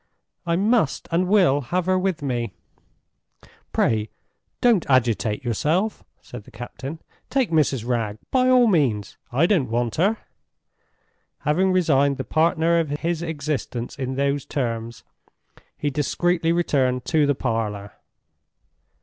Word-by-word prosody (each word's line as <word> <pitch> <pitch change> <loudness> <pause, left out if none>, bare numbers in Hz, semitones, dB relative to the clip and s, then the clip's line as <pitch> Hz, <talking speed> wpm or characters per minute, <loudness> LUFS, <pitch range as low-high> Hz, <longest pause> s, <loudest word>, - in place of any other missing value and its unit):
"I 170 - +2
must 205 - +1
and 175 +2 +1
will 180 -8 +4
have 175 +8 -2
her 185 0 +2
with 185 -5 -1
me!" 120 -4 -2 1.2
"Pray 110 -1 +1 0.5
don't 235 -7 +4
agitate 120 -3 +1
yourself," 160 - 0 0.2
said 120 -4 -10
the - - -14
captain. 130 +6 -7 0.3
"Take 260 -8 0
Mrs. 140 -7 +1
Wragge, 115 -4 -1
by 255 -1 +3
all 250 -1 +6
means. 135 - +1 0.2
I 135 +7 +3
don't 170 - +2
want 120 0 -1
her." 200 +7 +2 1.2
Having 185 +5 +2
resigned 140 -6 +2
the 130 - -3
partner 165 - +2
of 160 -3 -1
his 165 +3 -2
existence 145 -6 -4
in 130 0 -3
those 140 0 0
terms, 115 - -4 0.7
he 145 - -1
discreetly 165 +4 0
returned 130 -7 +1
to 155 -3 +2
the 145 - +2
parlor. 110 -5 -3
145 Hz, 130 wpm, -23 LUFS, 120-175 Hz, 1.2 s, all